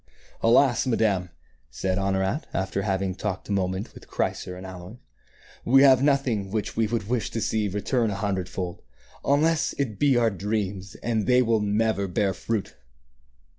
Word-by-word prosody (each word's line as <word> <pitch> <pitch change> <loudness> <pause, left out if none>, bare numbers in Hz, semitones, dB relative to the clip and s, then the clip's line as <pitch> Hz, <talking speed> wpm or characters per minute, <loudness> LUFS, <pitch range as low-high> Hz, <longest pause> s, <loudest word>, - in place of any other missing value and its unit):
"Alas, 120 +2 +4
madame," 100 -7 +1 0.4
said 95 +10 -2
Honorat, 95 +8 -1
after 95 +1 -1
having 95 -2 -1
talked 95 0 -4
a - - -5
mo 95 -2 +1
ment 95 +3 -5
with - - -14
Chrysor 90 - -2
and 95 - -9
Aloys, 95 +4 -9 0.7
"we 135 +3 +6
have 130 -2 +6
nothing 135 -8 +1
which 105 +1 -3
we 115 -1 +2
would 110 -2 -2
wish 120 -1 -1
to 115 - -3
see 110 -1 0
return 105 +4 0
a 100 - -3
hundred 100 -3 -2
fold, 90 -2 -5 0.4
unless 155 +3 +2
it 115 -8 -3
be 140 -4 +4
our 115 -2 +3
dreams; 100 -1 -3
and 115 -3 0
they 125 0 +5
will 115 -2 +2
never 105 -1 +1
bear 95 +2 0
fruit." 110 +2 -3
105 Hz, 170 wpm, -25 LUFS, 95-120 Hz, 0.7 s, we